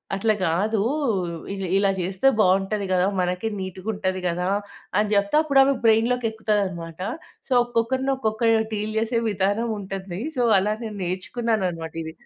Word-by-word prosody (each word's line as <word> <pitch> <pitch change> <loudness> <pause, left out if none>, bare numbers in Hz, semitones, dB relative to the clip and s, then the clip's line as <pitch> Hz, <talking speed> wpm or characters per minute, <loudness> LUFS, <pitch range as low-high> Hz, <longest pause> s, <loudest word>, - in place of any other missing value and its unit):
అట్లా 215 +2 +2
గాదు 195 +6 +1 0.7
ఇ - - -4 0.2
ఇలా 200 0 +3
చేస్తే 185 +8 0
బాగుంటది 195 +1 +2
కదా! 180 0 +3
మనకే 180 +4 -1
నీటుగుంటది 190 0 -3
కదా! 180 +1 -1 0.5
అని 210 0 +2
చెప్తే 200 +6 +2
అప్పుడు 280 -3 +3
ఆమె. 275 +1 +3
బ్రైన్‌లోకెక్కుతాదన్నమాట 220 -7 +1 0.5
సో, - - -21
ఒక్కొక్కరిని 240 +3 0
ఒక్కొక్కరు 220 -1 +2
డీల్ 215 +1 -2
చేసే 230 +1 0
విధానం 205 +4 0
ఉంటుంది 195 -1 -6 0.2
సో, 245 - +2 0.2
అలా 210 +2 0
నేను 215 -2 -6
నేర్చుకున్నానన్నమాట 185 -3 -2
ఇది. 160 0 -7
205 Hz, 130 wpm, -24 LUFS, 185-225 Hz, 0.7 s, ఇలా